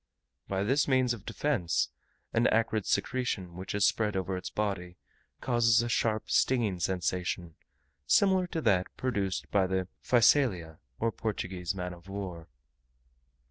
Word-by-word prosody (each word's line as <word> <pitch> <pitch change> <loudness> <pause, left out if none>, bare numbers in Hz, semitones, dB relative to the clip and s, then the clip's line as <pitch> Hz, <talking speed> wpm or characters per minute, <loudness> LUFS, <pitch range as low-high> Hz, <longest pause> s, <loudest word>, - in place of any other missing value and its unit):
Besides 95 +1 -1
this 140 +4 +2
means 130 -3 +3
of 110 -3 -10
defence, 115 - 0 0.4
an 115 +2 +3
acrid 110 -2 +1
secretion, 105 -9 -1
which 95 +2 -5
is 100 -2 +3
spread 105 -3 +1
over 95 0 -2
its 90 - -5
body, 95 -4 -3 0.4
causes 115 -2 +3
a 120 - -3
sharp, 110 -2 0
stinging 115 -8 +2
sensation, 90 -1 -2 0.5
similar 190 - +4
to 165 -2 -3
that 95 -7 +2
produced 100 -7 -2
by 95 -2 +3
the 95 -1 -1 0.2
Physalia, 115 - +3 0.2
or 115 0 +1
Portuguese 95 -5 -3
man 90 -1 -4
of 85 +2 -14
war. 90 -4 -6
100 Hz, 140 wpm, -30 LUFS, 90-120 Hz, 0.5 s, similar